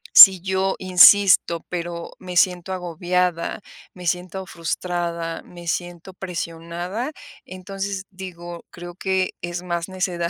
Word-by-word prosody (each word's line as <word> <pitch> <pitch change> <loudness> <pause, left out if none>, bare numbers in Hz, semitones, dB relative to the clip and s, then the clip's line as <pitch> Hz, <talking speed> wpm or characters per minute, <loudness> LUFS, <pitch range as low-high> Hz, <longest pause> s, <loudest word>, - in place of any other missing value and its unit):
Si 190 -3 +11
yo 190 0 0
insisto, 185 -2 +6
pero 170 -1 -5
me 180 -2 -6
siento 180 +1 +2
agobiada, 180 +1 -1 0.3
me 180 -1 -10
siento 180 +2 -2
frustrada, 170 0 -3
me 175 -1 -13
siento 175 +1 -4
presionada, 175 - -5 0.3
entonces 195 +1 -5
digo: 175 -2 -9
"Creo 175 0 -10
que 190 0 -1
es 175 0 -5
más 175 0 -3
necedad 180 -2 -2
180 Hz, 115 wpm, -22 LUFS, 170-190 Hz, 0.3 s, Si